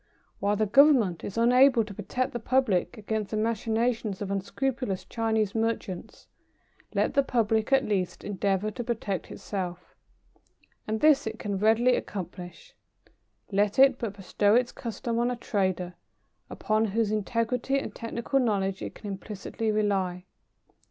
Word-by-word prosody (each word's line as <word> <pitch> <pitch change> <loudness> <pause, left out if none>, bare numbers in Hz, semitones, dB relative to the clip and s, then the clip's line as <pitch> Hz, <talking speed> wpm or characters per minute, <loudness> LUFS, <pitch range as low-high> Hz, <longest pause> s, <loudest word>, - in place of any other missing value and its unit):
While 205 +1 +1
the 215 +1 +1
Government 235 - +4
is 200 - -6
unable 250 +1 +5
to 210 -1 -9
protect 250 +6 -3
the 240 - -3
public 235 -5 +1
against 215 -1 -3
the 215 - -2
machinations 225 -1 0
of 200 -1 -4
unscrupulous 210 +1 -2
Chinese 220 -3 0
merchants, 225 -5 -3 0.7
let - - +1
the 280 - +4
public 225 -3 0
at 270 0 +4
least 190 -4 -1
endeavour 200 +1 -1
to 240 - -5
protect 215 -5 -3
itself. 180 -3 -6 0.9
And 220 0 -2
this 300 -6 +5
it 220 0 -4
can 200 -4 -3
readily 225 +4 +4
accomplish. 180 - -7 0.8
Let 205 +1 +1
it 270 -1 +6
but 215 -4 -4
bestow 205 +2 +2
its 245 0 +2
custom 230 0 -4
on 240 +1 +2
a 250 - -1
trader 185 -6 -1 0.6
upon 215 +1 0
whose 220 +1 0
integrity 230 +5 0
and 275 - -4
technical 235 +3 -2
knowledge 195 -6 0
it - - -6
can - - -13
implicitly 205 +2 -4
rely. 190 -4 0
220 Hz, 145 wpm, -27 LUFS, 200-240 Hz, 0.9 s, it